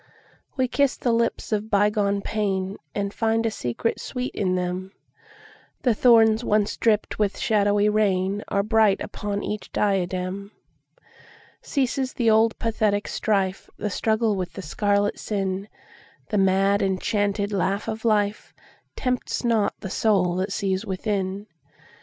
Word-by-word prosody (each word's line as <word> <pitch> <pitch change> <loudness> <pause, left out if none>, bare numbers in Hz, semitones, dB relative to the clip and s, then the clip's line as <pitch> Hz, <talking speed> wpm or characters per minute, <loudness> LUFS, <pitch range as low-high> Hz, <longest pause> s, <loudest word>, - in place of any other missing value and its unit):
We 260 -1 +2
kiss 280 +1 +1
the 245 - 0
lips 230 0 0
of 215 0 -1
bygone 205 -1 +2
painAnd 200 -2 -3
find 225 0 +1
a 225 - +1
secret 125 - -2
sweet 250 0 -4
in 185 -2 0
them:The 185 +6 -5
thorns 225 -1 +5
once 210 -2 +1
dripped 215 -2 +1
with 205 -2 +1
shadowy 205 -1 +2
rainAre 200 -1 +1
bright 220 -3 +4
upon 205 -1 -4
each 210 0 -5
diadem. 190 0 -1 1.1
Ceases 265 -1 -1
the 230 -3 +2
old 220 +1 +3
pathetic 215 -2 0
strife, 195 -3 -1
The 210 - -3
struggle 220 +2 +1
with 180 -2 -4
the 195 - -7
scarlet 205 +4 0
sin:The 200 +1 -5
mad 195 +1 +3
enchanted 200 +1 0
laugh 195 +1 -1
of 220 0 -3
lifeTempts 220 +4 -2
not 225 -3 +2
the 190 - -5
soul 195 -6 +2
that 190 +2 -1
sees 195 0 -1
within. 195 -1 -2
205 Hz, 125 wpm, -24 LUFS, 195-220 Hz, 1.1 s, thorns